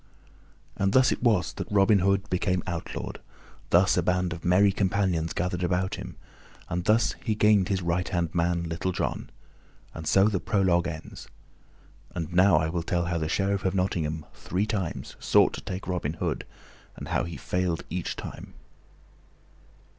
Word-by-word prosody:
And 100 0 0
thus 130 -1 +5
it - - -2
was 110 -7 +2
that - - -5
Robin 100 0 +5
Hood 100 +1 +1
became 90 -1 0
outlawed; 85 -1 -5 0.5
thus - - +4
a - - +4
band 90 -1 0
of 80 - -9
merry 95 +3 +4
companions 95 -4 0
gathered 90 0 -2
about 90 +1 0
him, - - -7 0.5
and 90 0 -2
thus 110 +2 +3
he 110 -3 0
gained 105 -3 +4
his 95 -2 0
right 85 +1 0
hand 85 -2 -1
man, 85 0 +1
Little 85 +3 -2
John; - - -3 0.6
and 80 -1 -7
so 95 +4 +5
the 100 -3 0
prologue 90 -4 +2
ends. 80 -2 -8 0.9
And 85 -1 -4
now 95 +1 +5
I 80 0 +1
will 85 +1 -2
tell 85 +1 -1
how 85 -1 -1
the 80 -1 -2
Sheriff 100 +1 0
of 95 0 0
Nottingham 80 -5 -1
three 95 +4 -2
times 100 -6 -4
sought - - +4
to - - -6
take 95 +1 -6
Robin 85 -5 -2
Hood, 85 - -3 0.5
and - - -8
how - - +1
he 85 -3 -6
failed 90 +4 -1
each - - -3
time. - - -9
90 Hz, 170 wpm, -27 LUFS, 85-95 Hz, 0.9 s, thus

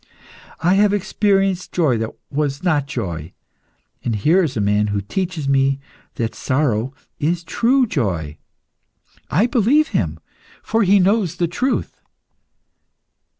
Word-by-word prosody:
I 175 +3 +3
have 205 +1 +4
experienced 195 -2 0
joy 145 -10 +2
that 110 0 -2 0.2
was 145 +1 -2
not 150 -6 +1
joy, 85 - -5 0.7
and 115 - -1
here 155 - +3
is 135 -7 -2
a - - +1
man 105 +1 +2
who 100 -1 -1
teaches 160 - -3
me 135 0 +2 0.4
that 115 -1 -2
sorrow 130 -3 0 0.3
is 170 +3 0
true 250 +10 +2
joy. 85 - -2 0.9
I 190 +10 +3
believe 250 +6 +3
him, 80 -6 -1 0.4
for 225 +1 +1
he 200 0 +5
knows 190 -2 +2
the 175 - 0
truth." 250 +11 -2
155 Hz, 130 wpm, -20 LUFS, -, 0.9 s, he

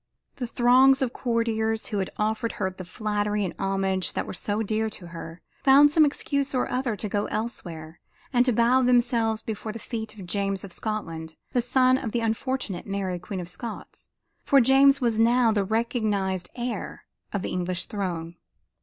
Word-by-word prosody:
The 245 - -3
throngs 260 +3 +5
of 250 -1 -2
courtiers 225 -2 0
who 210 - -1
had 190 - -2
offered 220 +2 -1
her - - -1
the 185 0 -9
flattery 210 +1 -1
and 180 - -4
homage 195 -1 0
that - - -2
were - - -6
so 205 +4 -2
dear 220 +1 0
to 180 -4 -9
her, 165 0 -9 0.2
found 285 +1 +7
some 310 0 +6
excuse 280 -1 -1
or 250 - +1
other 250 -3 -1
to 210 +2 -4
go 205 0 -1
elsewhere 170 -8 -5 0.3
and 245 -1 +5
to - - +4
bow 235 +3 +4
themselves 240 -3 +2
before 220 0 -4
the 220 - -7
feet 220 -1 -6
of 195 -3 -9
James 195 +1 -1
of 195 -3 -7
Scotland, 165 -7 -4 0.2
the 245 - +3
son 255 +1 +3
of 230 -6 -5
the 240 - 0
unfortunate 225 -4 -2
Mary 195 -2 -2
Queen 185 +2 -6
of 175 - -5
Scots, 220 +5 -8 0.3
for 280 - +5
James 270 +2 +5
was 230 -3 +1
now 235 0 +4
the 205 -2 +1
recognized 210 -4 -1
heir 240 -1 -5 0.3
to - - -1
the 190 - -3
English 180 0 -2
throne. 175 -4 -4
220 Hz, 180 wpm, -26 LUFS, 195-245 Hz, 0.3 s, found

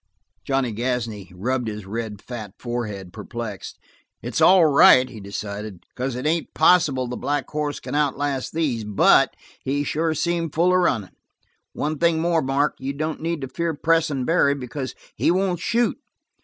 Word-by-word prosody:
Johnny 135 -1 0
Gasney 115 -5 -3
rubbed 120 +7 -2
his 105 -2 -5
red, 105 0 -5
fat 110 -6 -7
forehead, 105 -7 -5
perplexed. 110 -2 -7 0.5
"It's - - -2
all 185 -2 +7
right," 130 -3 +7
he 120 -4 -10
decided, 100 -1 -6
"because 130 0 -4
it 125 +3 -5
ain't 160 +2 -1
possible 155 -6 +4
the 125 - -4
black 145 +3 -2
hoss 150 -1 -2
can - - -7
outlast 145 -2 0
these. 145 -9 -1
But 105 -1 +4 0.3
he 145 +2 0
sure 160 +2 -1
seemed 165 0 -1
full 175 +3 +3
of 185 - +4
runnin! 115 - 0 0.6
One 150 0 -2
thing 170 -1 +3
more, 165 0 +2
Mark. 140 +2 +1
You 135 +1 -3
don't 155 +2 -3
need 165 -1 -2
to 135 - -4
fear 165 +4 -2
pressin' 155 -4 +1
Barry, 140 -3 +3
because 130 0 -6 0.2
he - - +1
won't 180 0 +1
shoot. 230 +8 0
135 Hz, 165 wpm, -23 LUFS, 115-160 Hz, 0.6 s, all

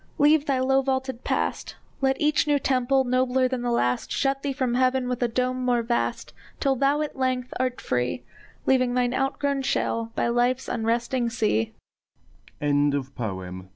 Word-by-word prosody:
Leave 295 +1 +4
thy 275 -2 +2
low 265 +1 +3
vaulted 260 -2 -2
past! - - -2 0.3
Let 265 0 +1
each 300 0 +2
new 290 -1 +3
temple, 265 0 +2
nobler 255 0 +2
than 255 -1 -3
the 245 - -1
last, 125 - 0
Shut 275 0 0
thee 280 - -2
from 260 -3 -1
heaven 255 0 +2
with 250 0 -3
a 245 - +3
dome 255 +2 -1
more 245 -2 +2
vast, 235 +1 -2 0.3
Till 275 -2 +2
thou 280 +3 +2
at 300 - -3
length 255 -1 -1
art 255 -1 -1
free, 125 - -2 0.4
Leaving 255 -2 +2
thine 245 0 +1
outgrown 275 +1 0
shell 230 -3 -1
by - - +1
life's 245 +2 +1
unresting 235 +2 0
sea! 115 - 0
255 Hz, 155 wpm, -25 LUFS, 240-270 Hz, 0.4 s, Leave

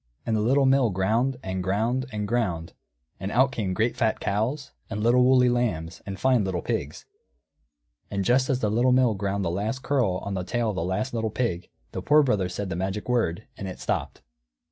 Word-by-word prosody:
And 115 - 0
the 105 - +1
Little 135 +5 +3
Mill 135 -2 +4
ground, 110 +8 +1
and 95 0 -3
ground, 115 +8 0
and 105 -2 -3
ground, 95 -8 -1 0.5
and 95 +2 -4
out 130 +3 +3
came 105 -7 -2
great 110 +4 +1
fat 110 -2 0
cows, 125 +8 -2 0.2
and 105 -1 -3
little 120 +2 +5
woolly 125 0 +5
lambs, 105 -10 -1
and 95 -1 -5
fine 130 -4 +3
little 95 -3 -2
pigs; - - -3 1.0
and 100 -1 -2
just 130 +4 +3
as 130 -2 +1
the 105 - +1
Little 125 +3 +3
Mill 125 -3 +4
ground 100 -1 -2
the 85 - 0
last 110 +8 -3
curl 125 -10 +1
on 100 - -4
the 95 -1 -2
tail 115 +3 -1
of - - -7
the 85 - -1
last 100 +9 -2
little 115 -1 -1
pig, 95 -6 -2 0.2
the - - -4
Poor 150 +1 +5
Brother 105 -9 +1
said 95 +2 -4
the - - -2
magic 95 +3 -3
word, 115 -6 0
and 95 - -6
it 95 - -7
stopped. - - -3
110 Hz, 210 wpm, -26 LUFS, 95-125 Hz, 1.0 s, little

